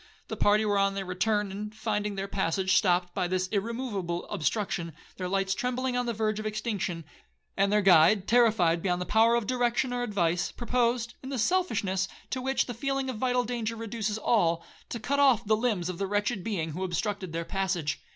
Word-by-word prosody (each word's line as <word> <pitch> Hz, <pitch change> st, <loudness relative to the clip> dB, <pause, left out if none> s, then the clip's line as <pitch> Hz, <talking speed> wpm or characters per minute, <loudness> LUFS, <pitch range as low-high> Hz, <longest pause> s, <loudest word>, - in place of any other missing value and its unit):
The -, -, -3 dB
party 210 Hz, +1 st, +3 dB
were 205 Hz, -1 st, +2 dB
on 195 Hz, 0 st, +2 dB
their 195 Hz, -1 st, -3 dB
return, 200 Hz, +2 st, 0 dB
and 210 Hz, +2 st, -6 dB
finding 210 Hz, -2 st, -2 dB
their 195 Hz, 0 st, -3 dB
passage 190 Hz, 0 st, 0 dB
stopped 180 Hz, -3 st, +2 dB
by 180 Hz, -, 0 dB
this 185 Hz, 0 st, -1 dB
irremoveable 205 Hz, -5 st, -2 dB
obstruction, 170 Hz, -1 st, -1 dB, 0.2 s
their 185 Hz, -, -3 dB
lights 195 Hz, 0 st, 0 dB
trembling 250 Hz, +3 st, -2 dB
on 245 Hz, 0 st, 0 dB
the -, -, +1 dB
verge 215 Hz, -1 st, -1 dB
of 215 Hz, -, -3 dB
extinction, 205 Hz, -6 st, -3 dB, 0.5 s
and 200 Hz, 0 st, +2 dB
their 210 Hz, 0 st, +3 dB
guide 190 Hz, +2 st, +5 dB
terrified 215 Hz, -9 st, +4 dB
beyond 180 Hz, -1 st, 0 dB
the 180 Hz, -, -3 dB
power 225 Hz, +3 st, +4 dB
of 235 Hz, -2 st, 0 dB
direction 245 Hz, +1 st, 0 dB
or 245 Hz, -, -1 dB
advice, 180 Hz, -7 st, 0 dB
proposed, 240 Hz, -1 st, 0 dB
in 265 Hz, -, -7 dB
the 275 Hz, -, -3 dB
selfishness 215 Hz, -, +1 dB, 0.2 s
to 260 Hz, -, -2 dB
which 265 Hz, +1 st, +1 dB
the 245 Hz, -, -5 dB
feeling 270 Hz, +2 st, -2 dB
of 235 Hz, -, -7 dB
vital 250 Hz, +1 st, +1 dB
danger 230 Hz, -1 st, -3 dB
reduces 220 Hz, -2 st, -3 dB
all, 170 Hz, -7 st, +1 dB, 0.2 s
to 235 Hz, -, -4 dB
cut 280 Hz, +5 st, -1 dB
off 255 Hz, -5 st, +4 dB
the 215 Hz, +1 st, +3 dB
limbs 215 Hz, -6 st, 0 dB
of 185 Hz, -2 st, -5 dB
the 195 Hz, -, -1 dB
wretched 205 Hz, 0 st, -1 dB
being 170 Hz, -8 st, -2 dB
who 180 Hz, +5 st, -4 dB
obstructed 190 Hz, +1 st, -2 dB
their 165 Hz, +1 st, -3 dB
passage. 185 Hz, -6 st, -2 dB
210 Hz, 200 wpm, -28 LUFS, 185-235 Hz, 0.5 s, guide